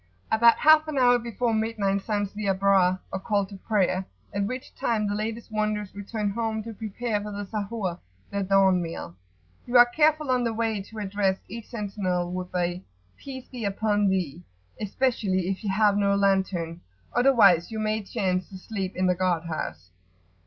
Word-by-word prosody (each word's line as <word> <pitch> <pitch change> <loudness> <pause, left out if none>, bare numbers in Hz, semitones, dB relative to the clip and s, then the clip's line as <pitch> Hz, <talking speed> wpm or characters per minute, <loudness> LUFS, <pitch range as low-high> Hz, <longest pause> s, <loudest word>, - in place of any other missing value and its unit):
About 230 +1 +6
half 310 0 +6
an 305 -2 -3
hour 245 -1 +5
before 235 0 -1
midnight 220 -3 0
sounds 205 -1 -2
the 210 0 -4
Abrar[FN#27] 190 -1 +3
or 190 - -1
call 200 0 0
to 200 +1 -11
prayer, 190 -2 0 0.3
at 200 0 0
which 255 +4 -6
time 220 -3 0
the 205 - -1
latest 220 +2 -4
wanderers 215 -2 -1
return 205 +1 -3
home 220 0 -2
to 225 +1 -7
prepare 220 +1 -3
for 210 0 -6
the 205 0 -5
Sahur, 200 -3 -3 0.3
their 200 - -1
dawn 190 -1 +4
meal. 165 - -6 0.5
You 245 +1 +4
are 240 - +10
careful 305 +2 +2
on 250 -1 +2
the 230 -1 -1
way 220 -2 -1
to 220 +3 -12
address 195 -2 0
each 230 +2 -8
sentinel 195 -5 -2
with 180 0 -4
a 175 0 -1 0.3
"Peace 260 -2 -9
be 245 -3 -7
upon 205 0 +1
thee!" 175 -4 -1 0.4
especially 200 -5 0
if 195 +2 -3
you 205 - -2
have 205 +1 +3
no 200 -1 +2
lantern, 190 -4 0 0.3
otherwise 220 -9 +5
you 225 - -5
may 215 0 0
chance 190 -3 -2
to 190 - -9
sleep 190 -1 -5
in 185 - 0
the 180 - +4
guard 180 -2 0
house. 125 - -5
205 Hz, 180 wpm, -26 LUFS, 190-225 Hz, 0.5 s, are